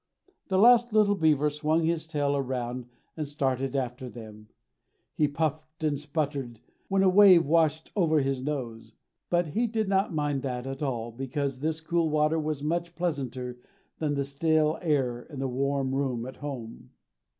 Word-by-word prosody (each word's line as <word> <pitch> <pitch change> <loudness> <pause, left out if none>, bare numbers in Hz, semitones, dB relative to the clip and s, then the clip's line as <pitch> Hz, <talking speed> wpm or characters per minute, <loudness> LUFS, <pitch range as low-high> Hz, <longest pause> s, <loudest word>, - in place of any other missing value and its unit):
The 190 - +1
last 240 +2 +6
little 210 -2 +4
beaver 150 -5 +2
swung 155 +2 0
his 160 -1 0
tail 145 -3 0
around 125 -2 -3 0.3
and 155 -2 -3
started 135 -2 -1
after 125 -1 -3
them. 110 -3 -11 0.7
He 150 - +2
puffed 155 +1 -3
and 145 -3 0
sputtered 145 -6 -3 0.3
when 195 0 +2
a - - +5
wave 185 -3 +7
washed 160 0 +2
over 160 -6 +3
his 135 -2 -1
nose. 130 -5 -5 0.4
But 175 -2 +1
he 235 +10 0
did 220 -2 -1
not 195 0 +1
mind 145 -3 -1
that 125 -2 -4
at 135 +1 -6
all, 120 -5 -2
because 135 +2 -3
this 160 +2 -2
cool 165 0 0
water 155 +1 +2
was 150 -2 -3
much 170 +2 -2
pleasanter 130 -7 -3 0.4
than 150 -2 0
the 140 -1 -1
stale 155 +2 +1
air 135 -8 0
in 145 +3 -11
the 135 0 -1
warm 135 +1 -1
room 130 -4 -1
at 130 - -8
home. 130 -6 -7
145 Hz, 165 wpm, -28 LUFS, 130-160 Hz, 0.7 s, wave